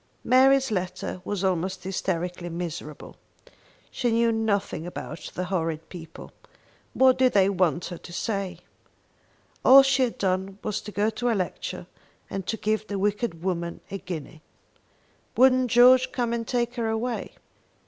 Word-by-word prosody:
Mary's 265 Hz, 0 st, +4 dB
letter 185 Hz, -1 st, -3 dB
was 200 Hz, 0 st, -3 dB
almost 185 Hz, 0 st, -1 dB
hysterically 180 Hz, -1 st, -3 dB
miserable. 165 Hz, -3 st, -7 dB, 0.7 s
She 245 Hz, -, -1 dB
knew 230 Hz, 0 st, +3 dB
nothing 205 Hz, -6 st, -1 dB
about 175 Hz, -, -7 dB
the 180 Hz, -, -2 dB
horrid 165 Hz, -3 st, -3 dB
people. 165 Hz, -3 st, -10 dB, 0.6 s
What 260 Hz, -1 st, +5 dB
did 255 Hz, -1 st, +4 dB
they 195 Hz, -1 st, +4 dB
want 175 Hz, -3 st, +1 dB
her 175 Hz, -, -7 dB
to -, -, -12 dB
say? 190 Hz, -2 st, -3 dB, 1.0 s
All 270 Hz, +1 st, +9 dB
she 270 Hz, 0 st, +2 dB
had 250 Hz, -3 st, 0 dB
done 190 Hz, 0 st, -1 dB
was 210 Hz, -1 st, -2 dB
to 210 Hz, -, -8 dB
go 210 Hz, +2 st, +1 dB
to 245 Hz, +2 st, -2 dB
a 230 Hz, -, +2 dB
lecture, 185 Hz, -2 st, -4 dB, 0.5 s
and 190 Hz, -1 st, -4 dB
to 225 Hz, -, -1 dB
give 215 Hz, 0 st, -1 dB
the 200 Hz, -, -3 dB
wicked 205 Hz, -3 st, -1 dB
woman 170 Hz, -2 st, -2 dB
a 195 Hz, -, -4 dB
guinea. 160 Hz, -3 st, -7 dB, 1.0 s
Wouldn't 255 Hz, 0 st, +5 dB
George 255 Hz, +2 st, +6 dB
come 240 Hz, -2 st, -1 dB
and 230 Hz, -1 st, -3 dB
take 240 Hz, 0 st, -1 dB
her 230 Hz, -1 st, -1 dB
away. 230 Hz, +2 st, -3 dB
200 Hz, 150 wpm, -25 LUFS, 180-240 Hz, 1.0 s, All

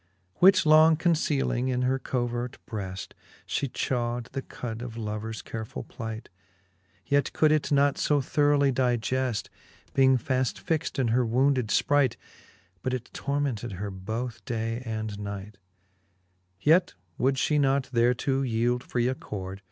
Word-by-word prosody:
XXVIL -, -, -34 dB
Which 190 Hz, -1 st, +7 dB
long 155 Hz, +1 st, +7 dB
concealing 150 Hz, -6 st, +1 dB
in 125 Hz, -1 st, 0 dB
her 130 Hz, +1 st, +1 dB
covert 120 Hz, -1 st, -2 dB
breft, 100 Hz, -4 st, -5 dB, 0.3 s
She 140 Hz, -, -1 dB
chaw'd 120 Hz, -1 st, -2 dB
the 135 Hz, -, -3 dB
cud 115 Hz, -3 st, -6 dB
of 120 Hz, -2 st, -7 dB
lovers 110 Hz, 0 st, -4 dB
carefull 110 Hz, -1 st, -6 dB
plight; 110 Hz, -2 st, -6 dB, 0.8 s
Yet 140 Hz, -1 st, +1 dB
could 155 Hz, -1 st, +4 dB
it 155 Hz, -1 st, +1 dB
not 140 Hz, 0 st, +3 dB
fo 145 Hz, -1 st, +2 dB
thoroughly 145 Hz, 0 st, +3 dB
digeft, 125 Hz, -2 st, 0 dB, 0.4 s
Being 130 Hz, -1 st, +5 dB
faft 130 Hz, 0 st, -1 dB
fixed 160 Hz, -2 st, -2 dB
in 130 Hz, -4 st, +1 dB
her 125 Hz, +3 st, +3 dB
wounded 130 Hz, +1 st, +2 dB
fpright, 135 Hz, +2 st, +2 dB, 0.3 s
' 90 Hz, +1 st, -32 dB
But 130 Hz, +4 st, -1 dB
it 125 Hz, -1 st, -7 dB
tormented 140 Hz, -6 st, -2 dB
her 100 Hz, +2 st, -4 dB
both 110 Hz, +4 st, -5 dB
day 115 Hz, +2 st, -3 dB
and 110 Hz, -2 st, -4 dB
night: 100 Hz, 0 st, -7 dB, 1.0 s
Yet 165 Hz, -, +3 dB, 0.2 s
would 135 Hz, +1 st, +2 dB
fhe 150 Hz, +3 st, +1 dB
not 135 Hz, -2 st, +1 dB
thereto 125 Hz, +3 st, +2 dB
yeeld 120 Hz, -1 st, +1 dB
free 120 Hz, 0 st, -1 dB
accord 95 Hz, -7 st, -5 dB
125 Hz, 145 wpm, -27 LUFS, 110-140 Hz, 1.0 s, Which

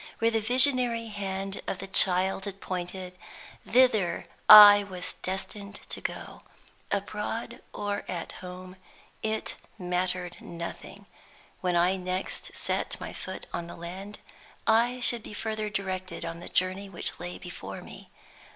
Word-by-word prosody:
Where 230 Hz, 0 st, +2 dB
the 225 Hz, -1 st, +1 dB
visionary 245 Hz, -1 st, +3 dB
hand 195 Hz, -1 st, -4 dB
of -, -, -2 dB
the 195 Hz, -, -6 dB
child 190 Hz, 0 st, +5 dB
had 195 Hz, -1 st, -6 dB
pointed, 180 Hz, 0 st, -5 dB, 0.5 s
thither 220 Hz, -8 st, +3 dB, 0.2 s
I 205 Hz, -1 st, +12 dB
was 185 Hz, -3 st, -4 dB
destined 200 Hz, +2 st, -5 dB
to -, -, -5 dB
go. -, -, -6 dB, 0.5 s
Abroad 210 Hz, +3 st, -3 dB
or 205 Hz, 0 st, -3 dB
at 175 Hz, -2 st, -4 dB
home, 185 Hz, 0 st, -9 dB, 0.4 s
it 220 Hz, 0 st, -2 dB, 0.2 s
mattered 180 Hz, -1 st, -2 dB
nothing: 170 Hz, +4 st, -8 dB, 0.5 s
when 180 Hz, -1 st, 0 dB
I 180 Hz, +2 st, +3 dB
next 185 Hz, +1 st, -4 dB
set -, -, -2 dB
my -, -, -6 dB
foot -, -, -7 dB
on 170 Hz, -, -3 dB
the -, -, -9 dB
land, 190 Hz, +5 st, -8 dB, 0.5 s
I 240 Hz, +3 st, +3 dB
should 240 Hz, -1 st, +3 dB
be 210 Hz, -, -9 dB
further 215 Hz, 0 st, -3 dB
directed 190 Hz, -2 st, -4 dB
on 165 Hz, 0 st, -5 dB
the 175 Hz, -, -9 dB
journey 185 Hz, +2 st, 0 dB
which 170 Hz, -3 st, -4 dB
lay 175 Hz, +1 st, -5 dB
before 100 Hz, -, -8 dB
me. -, -, -12 dB
190 Hz, 140 wpm, -28 LUFS, 180-210 Hz, 0.5 s, I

